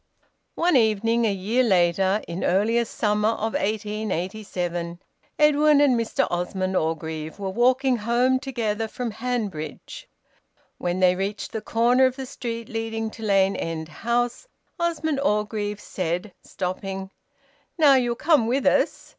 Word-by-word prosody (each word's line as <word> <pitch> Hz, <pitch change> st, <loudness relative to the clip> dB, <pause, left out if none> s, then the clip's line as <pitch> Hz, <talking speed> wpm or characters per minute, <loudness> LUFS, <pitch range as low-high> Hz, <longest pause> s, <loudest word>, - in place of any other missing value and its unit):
One 345 Hz, -1 st, +2 dB
evening, 225 Hz, 0 st, +3 dB
a 215 Hz, -, +2 dB
year 200 Hz, +6 st, 0 dB
later, 190 Hz, -1 st, +2 dB
in 170 Hz, +2 st, -4 dB
earliest 225 Hz, +5 st, +1 dB
summer 210 Hz, -1 st, +2 dB
of 225 Hz, 0 st, -2 dB
1887, 190 Hz, -4 st, -3 dB, 0.4 s
Edwin 300 Hz, 0 st, +5 dB
and 285 Hz, -3 st, +4 dB
Mr 230 Hz, -1 st, 0 dB
Osmond 185 Hz, +2 st, -2 dB
Orgreave 160 Hz, -1 st, -2 dB
were 195 Hz, -2 st, -4 dB
walking 255 Hz, +3 st, +2 dB
home 240 Hz, +4 st, +2 dB
together 225 Hz, -5 st, -2 dB
from 240 Hz, +1 st, -4 dB
Hanbridge. 210 Hz, -10 st, -5 dB, 0.7 s
When 180 Hz, +1 st, -2 dB
they 180 Hz, -1 st, +5 dB
reached 195 Hz, +2 st, -3 dB
the 220 Hz, -, -4 dB
corner 240 Hz, +4 st, +3 dB
of 255 Hz, -, -4 dB
the 265 Hz, -1 st, -6 dB
street 230 Hz, -3 st, -5 dB
leading 225 Hz, 0 st, -3 dB
to 225 Hz, -, -12 dB
Lane 195 Hz, -2 st, +2 dB
End 160 Hz, -1 st, -4 dB
House, 240 Hz, -, -2 dB, 0.3 s
Osmond 320 Hz, -4 st, 0 dB
Orgreave 210 Hz, -4 st, -1 dB
said, 180 Hz, +1 st, -3 dB
stopping 190 Hz, +1 st, -5 dB, 0.7 s
"Now 300 Hz, -4 st, +6 dB
you'll 245 Hz, -3 st, +2 dB
come 295 Hz, -4 st, +3 dB
with 265 Hz, +4 st, 0 dB
us?" -, -, +1 dB
220 Hz, 135 wpm, -24 LUFS, 190-245 Hz, 0.7 s, Now